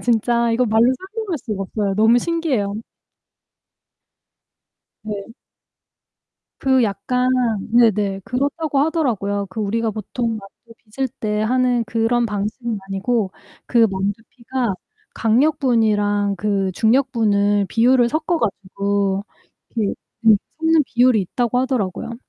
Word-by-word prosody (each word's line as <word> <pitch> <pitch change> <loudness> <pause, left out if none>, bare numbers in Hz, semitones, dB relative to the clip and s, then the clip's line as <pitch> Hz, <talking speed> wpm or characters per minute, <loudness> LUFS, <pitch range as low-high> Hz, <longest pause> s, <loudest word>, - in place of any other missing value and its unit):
진짜. 235 0 +1
이거 240 +2 +2
말로 225 +3 +4
설명할 390 -2 -5
수가 210 -5 -4
없어요. 200 0 -2
너무 220 +4 +4
신기해요. 270 -11 -1 2.3
네. 210 -1 -4 1.4
그 260 -1 +3
약간 230 +5 0 0.4
네네 210 -4 +3
그렇다고 285 +3 -1
하더라고요. 235 - 0
그 220 - -5
우리가 225 +2 0
보통 220 +2 -3
만두 215 +3 -16
빚을 260 +4 -4
때 210 -1 -1
하는 250 0 +1
그런 230 +2 +1
방식은 215 +2 -3
아니고 195 +1 -1 0.3
그 235 -2 +4
만두피가 225 +4 -3 0.4
강력분이랑 220 -5 +2
그 195 -1 -1
중력분을 215 -4 +2
비율을 245 +1 +3
섞어 315 +5 -1
가지고 200 -2 -1 0.5
이렇게 215 -4 -1 0.3
네 225 -2 +6 0.2
섞는 320 -1 +3
비율이 245 -2 +3
있다고 240 +6 -1
하더라고요. 235 -4 -2
225 Hz, 260 characters per minute, -20 LUFS, 205-250 Hz, 2.3 s, 네